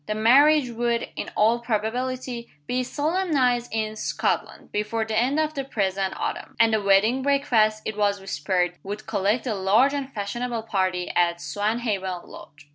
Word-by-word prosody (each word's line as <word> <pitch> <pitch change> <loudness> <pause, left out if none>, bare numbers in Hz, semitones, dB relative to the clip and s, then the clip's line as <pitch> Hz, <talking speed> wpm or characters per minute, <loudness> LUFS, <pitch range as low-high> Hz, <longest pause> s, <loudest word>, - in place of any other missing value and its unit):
The 215 - -1
marriage 265 +4 +5
would, 235 0 -1
in - - -4
all 225 +3 +3
probability, 240 +2 -3 0.2
"be 250 +7 -1
solemnized 285 -4 0
in 215 0 -2
Scotland, - - -2
before 215 +2 -1
the 220 0 -3
end 255 +7 +2
of 310 0 0
the 275 -2 -3
present 195 -6 -1
autumn;" - - -4
and 225 -1 +5
the 215 - +2
wedding 205 +6 +3
breakfast, 240 -6 +2
it 215 - -3
was 205 -1 +1
whispered, 180 0 -1
"would 205 +2 -6
collect 210 +4 0
a 240 - -1
large 210 +8 +3
and 275 -2 -3
fashionable 230 +2 -3
party 185 -4 -1
at 170 -1 +2
Swanhaven 205 -3 -2
Lodge." 145 0 -13
220 Hz, 160 wpm, -24 LUFS, 200-250 Hz, 0.2 s, marriage